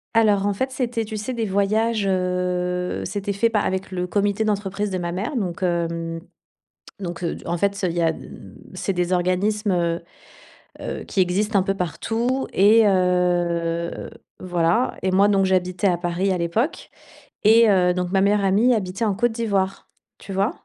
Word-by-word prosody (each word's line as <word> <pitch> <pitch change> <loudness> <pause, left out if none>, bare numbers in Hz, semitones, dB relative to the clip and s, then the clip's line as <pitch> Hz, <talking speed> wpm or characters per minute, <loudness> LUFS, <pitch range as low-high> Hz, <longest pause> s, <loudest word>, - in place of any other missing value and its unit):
Alors 205 -3 +4
en 205 - +1
fait, 260 +7 -2
c'était 245 -3 -2
tu 215 0 -6
sais, 215 +5 -4
des 230 -2 -2
voyages, 210 +2 +1
heu, 180 -1 -1
c'était 205 -1 -3
fait 230 +4 +2
pa 220 -2 +1
avec 190 -1 -2
le 180 -1 -2
comité 205 +3 0
d'entreprise 205 -1 -1
de 190 - -2
ma 175 -1 -3
mère 195 +10 -3
donc 185 -8 -3
hem, 170 -2 -1 0.8
donc 175 -2 -5
heu, 170 - -1
d - - -12
en 170 - -1
fait 200 +3 +1
ça 195 -2 -1
il 170 - -4
y 170 - +1
a 165 -1 +3
d - - -11 0.5
c'est 195 - -2
des 180 0 0
organismes, 195 +4 0
heu, 170 -1 0 0.8
heu, - - -5
qui 195 - -1
existent 200 +4 +1
un - - +3
peu 195 +1 -1
partout 225 - -2
et 215 +4 +6
heu, 175 -2 0 0.3
voilà 175 +6 +1
et 185 - 0
moi, 200 +2 +5
donc 195 -1 +3
j'habitais 185 0 0
à 180 -2 +3
Paris 175 +2 0
à 185 - -1
l'époque 175 - -2 0.5
et 225 +1 +6
heu, 180 -2 +3
donc 180 -1 -2
ma 195 0 +2
meilleure 200 +1 +2
amie 210 +6 +4
habitait 195 +1 -2
en 210 -3 +1
Côte 240 +4 +1
d'Ivoire, 200 -4 -1 0.3
tu 195 - -9
vois? 195 +4 +1
195 Hz, 185 wpm, -22 LUFS, 180-210 Hz, 0.8 s, et